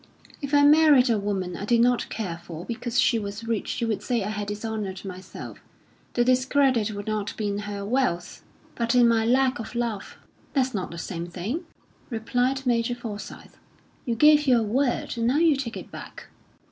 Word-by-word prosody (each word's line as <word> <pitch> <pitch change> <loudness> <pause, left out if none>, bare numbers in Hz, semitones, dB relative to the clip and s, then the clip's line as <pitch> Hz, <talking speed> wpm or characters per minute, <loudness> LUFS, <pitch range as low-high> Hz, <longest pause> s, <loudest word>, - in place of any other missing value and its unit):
"If 280 -1 -4
I 285 - +6
married 290 -4 +6
a 220 - +2
woman 195 -3 -2
I 195 - -6
did 235 +2 +3
not 245 0 +2
care 180 -7 -4
for 170 0 -8
because 240 +1 -2
she 230 - +3
was 205 +2 -6
rich, 230 -3 -2
you 235 - 0
would 220 -2 -1
say 240 -4 -1
I 205 - -3
had 210 -1 -4
dishonoured 205 -2 -4
myself. 185 0 -8 0.6
The 240 - +4
discredit 255 -2 +3
would 205 0 -6
not 215 -1 -3
be 210 -2 -1
in 200 0 -2
her 200 -1 -4
wealth, 205 -7 -1 0.3
but 235 +1 0
in 245 -1 +6
my 230 -1 +3
lack 260 +1 +3
of 225 +1 -7
love." 235 -4 -3 0.4
"That's 260 -2 +1
not 190 -4 -3
the 170 - -8
same 170 0 -5
thing," 205 - -4 0.4
replied 250 +3 -1
Major 240 -1 +1
Forsyth. 220 -4 -8 0.5
"You 235 - -1
gave 300 +3 +5
your 245 -3 +5
word, 240 +2 0
and 230 - +1
now 260 +4 +2
you 325 -2 +4
take 265 -4 -4
it - - -9
back." - - -10
230 Hz, 190 wpm, -25 LUFS, 205-255 Hz, 0.6 s, I